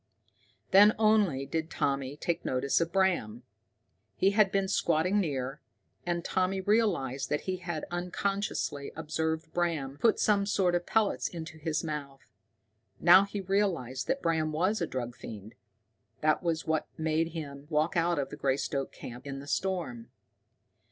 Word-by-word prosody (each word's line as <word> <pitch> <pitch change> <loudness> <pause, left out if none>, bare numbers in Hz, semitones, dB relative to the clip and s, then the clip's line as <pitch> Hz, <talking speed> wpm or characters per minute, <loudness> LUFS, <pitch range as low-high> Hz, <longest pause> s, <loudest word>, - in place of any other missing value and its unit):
Then 205 +3 +7
only 210 -11 +3
did 160 +3 -3
Tommy 140 -2 -1
take 170 +2 -2
notice 130 +4 +1
of 170 0 -1
Bram. 175 - +1 0.7
He 195 - +3
had 205 -1 +4
been 195 0 +1
squatting 185 0 +2
near, 135 -5 -2 0.5
and 170 -1 -1
Tommy 185 +1 0
realized 185 - +1
that 150 - 0
he 185 -1 -3
had 170 -3 -4
unconsciously 180 -4 -2
observed 160 +1 -2
Bram 155 -6 -1
put 230 - +3
some 200 -2 +3
sort 190 -3 +2
of 175 0 -1
pellets 220 -2 +1
into 160 -2 -8
his 155 +1 -1
mouth. 145 -4 -6 0.7
Now 180 +3 +7
he 200 0 -5
realized 180 - -1
that 270 +1 -1
Bram 160 -2 +1
was 185 +8 +1
a - - 0
drug 120 -2 -4
fiend. 105 0 -9 0.7
That 155 0 +2
was 165 -3 -1
what 160 -1 0
had - - -22
made 160 +1 +1
him 145 -3 -7
walk 155 +1 +1
out 170 0 +2
of 140 - -2
the 150 - -7
Greystoke 135 0 -1
camp 125 +3 -9
in 135 0 -5
the 140 - -8
storm. 150 -8 -2
160 Hz, 155 wpm, -30 LUFS, 140-190 Hz, 0.7 s, Then